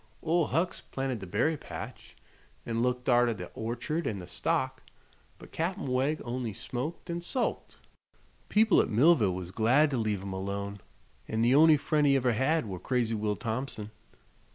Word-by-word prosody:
Ol' 165 Hz, -1 st, +2 dB
Hucks 165 Hz, +6 st, -1 dB
planted 135 Hz, -3 st, -3 dB
the 95 Hz, -, -8 dB
berry 155 Hz, -, +1 dB
patch -, -, -9 dB, 0.5 s
an' 115 Hz, 0 st, -1 dB
looked 125 Hz, 0 st, -1 dB
arter 120 Hz, -2 st, +4 dB
the 90 Hz, -3 st, -8 dB
orchard 120 Hz, +9 st, -3 dB
an' 105 Hz, -, -2 dB
the 90 Hz, -, -7 dB
stock; 90 Hz, -, -1 dB, 0.6 s
but -, -, -14 dB
Cap'n 175 Hz, +4 st, -2 dB
Wegg 135 Hz, +4 st, 0 dB
on'y 120 Hz, -2 st, -3 dB
smoked 145 Hz, -, -5 dB
an' 170 Hz, 0 st, -3 dB
sulked. 235 Hz, +8 st, -2 dB, 0.7 s
People 215 Hz, -1 st, +5 dB
at -, -, -2 dB
Millville 115 Hz, -, +4 dB
was 90 Hz, -1 st, -6 dB
glad 130 Hz, +9 st, +3 dB
to 135 Hz, -, 0 dB
leave 105 Hz, -4 st, -1 dB
him 100 Hz, -1 st, -5 dB
alone, 100 Hz, +1 st, -4 dB, 0.5 s
an' 110 Hz, +1 st, 0 dB
the 120 Hz, +2 st, +4 dB
on'y 155 Hz, +2 st, +7 dB
friend 145 Hz, +1 st, +1 dB
he 140 Hz, -, +5 dB
ever 125 Hz, -2 st, +2 dB
had 135 Hz, +6 st, +1 dB
were 95 Hz, -4 st, -5 dB
crazy 120 Hz, -1 st, 0 dB
Will 105 Hz, -1 st, -1 dB
Thompson." 110 Hz, -2 st, -4 dB
125 Hz, 170 wpm, -29 LUFS, 110-150 Hz, 0.7 s, on'y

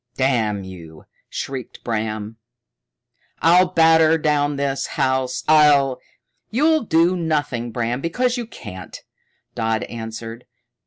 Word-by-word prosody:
"Damn 115 Hz, -7 st, 0 dB
you," 85 Hz, -4 st, -11 dB, 0.2 s
shrieked 130 Hz, -3 st, -6 dB
Bram. 110 Hz, -1 st, -3 dB, 1.0 s
"I'll 180 Hz, +3 st, +5 dB
batter 160 Hz, -2 st, +4 dB
down 150 Hz, -2 st, +1 dB
this 140 Hz, -1 st, -2 dB
house. 130 Hz, -1 st, 0 dB
I'll 145 Hz, -4 st, +5 dB, 0.3 s
" 125 Hz, -, -52 dB
"You'll 310 Hz, +7 st, +2 dB
do 170 Hz, -2 st, +2 dB
nothing, 145 Hz, -8 st, -1 dB
Bram, 120 Hz, +2 st, -2 dB
because 245 Hz, -, 0 dB
you 240 Hz, -3 st, -4 dB
can't," 95 Hz, -, -10 dB, 0.5 s
Dodd 110 Hz, -2 st, -1 dB
answered. 115 Hz, +1 st, -7 dB
135 Hz, 110 wpm, -21 LUFS, 115-160 Hz, 1.0 s, I'll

